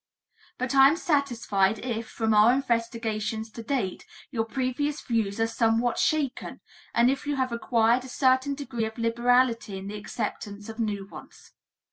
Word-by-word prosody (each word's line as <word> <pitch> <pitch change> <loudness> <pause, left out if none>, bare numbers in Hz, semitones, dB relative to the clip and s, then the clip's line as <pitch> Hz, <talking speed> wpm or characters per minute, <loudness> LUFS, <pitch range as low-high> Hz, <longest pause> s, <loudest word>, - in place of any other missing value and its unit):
But 255 +1 -2
I 270 0 +8
am 305 +4 +2
satisfied 230 - +1
if, 230 -1 -4
from 225 -1 0
our 210 +2 +6
investigations 230 -3 -2
to 230 - -8
date, 225 -6 -2 0.3
your 225 -4 -1
previous 270 +4 -2
views 225 -4 -1
are 225 - +3
somewhat 230 +1 +1
shaken 290 -5 -1 0.4
and 240 +2 +5
if 275 +1 -4
you 290 - 0
have 260 -2 -1
acquired 235 +1 +2
a 260 - -9
certain 260 +2 +2
degree 245 -5 -3
of 220 +1 -7
liberality 235 -2 +2
in 190 - -8
the 210 - -5
acceptance 205 0 -5
of 225 +1 -8
new 205 -3 -2
ones. 195 - -13
235 Hz, 160 wpm, -26 LUFS, 220-260 Hz, 0.4 s, I